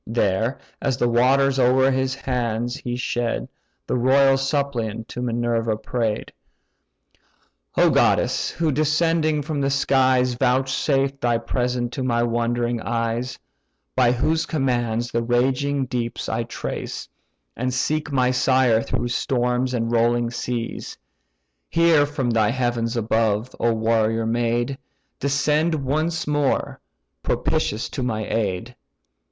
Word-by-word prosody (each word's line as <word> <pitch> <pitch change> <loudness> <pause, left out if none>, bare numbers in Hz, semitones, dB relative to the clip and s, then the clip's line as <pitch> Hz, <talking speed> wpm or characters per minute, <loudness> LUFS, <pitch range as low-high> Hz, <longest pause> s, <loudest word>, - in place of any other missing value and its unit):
There, 115 +2 0 0.2
as 135 -4 0
the 120 - +2
waters 135 +3 +3
o'er 130 +1 +4
his 130 0 0
hands 120 -3 -2
he 120 -1 -4
shed, 120 - -2 0.4
The - - -1
royal 135 +2 +5
suppliant 135 -5 -2
to 125 - -5
Minerva 115 -2 0
pray'd: 110 -1 -2 1.5
"O - - +5
goddess! - - +2
who 160 -2 -1
descending 155 +1 +1
from 150 0 -3
the 140 - +1
skies 130 -2 +2
Vouchsafed 135 +2 +1
thy 120 -1 +2
presence 120 0 -2
to 135 - -3
my 120 -2 +1
wondering 120 0 0
eyes, 115 +2 -2 0.6
By 125 -2 +4
whose 155 +6 0
commands 120 -5 -1
the 115 - 0
raging 130 +4 +1
deeps 120 -2 -3
I - - -1
trace, - - -5 0.5
And 125 +2 -2
seek 150 +4 -1
my 130 -2 +2
sire 125 -2 +3
through 120 - -2
storms 125 0 0
and 115 -2 -1
rolling 120 0 +2
seas! 120 -1 -4 0.7
Hear 165 -3 +4
from 135 -4 -1
thy 110 -2 +2
heavens 120 -1 -1
above, 110 +1 0
O 115 - +2
warrior 115 0 +1
maid! 120 +3 0 0.4
Descend 150 +4 +1
once 155 +4 -1
more, 145 -2 0 0.4
propitious 110 +3 -1
to - - -5
my 110 -4 -2
aid. 110 +1 -2
125 Hz, 125 wpm, -22 LUFS, 115-135 Hz, 1.5 s, royal